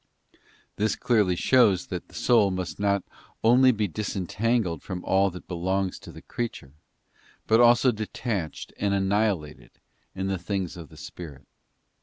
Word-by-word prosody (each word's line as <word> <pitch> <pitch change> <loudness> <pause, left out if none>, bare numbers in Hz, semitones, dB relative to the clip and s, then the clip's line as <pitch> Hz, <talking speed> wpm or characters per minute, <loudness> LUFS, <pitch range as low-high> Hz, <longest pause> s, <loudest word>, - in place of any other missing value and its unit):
This 105 -1 +1
clearly 105 -7 +2
shows 100 -3 +3
that 90 -2 -6
the - - -17
soul 115 -5 +4
must 90 -4 -4
be 100 - -5
not 100 -2 +2 0.4
only 125 +3 +6
disentangled 105 -1 -1
from 90 -1 -6
all 95 +1 +3
that 90 -1 -11
belongs 95 +2 -2
to - - -11
the - - -13
creature, 115 - -5 0.7
but 110 +1 +4
also 120 +2 +6
detached 110 -5 -4
and 100 -1 +1
annihilated 95 -5 -1 0.4
in 95 0 -3
the 95 -1 -1
things 95 0 -3
of 85 -5 -10
the - - -15
spirit. 75 -7 -10
100 Hz, 145 wpm, -26 LUFS, 90-110 Hz, 0.7 s, only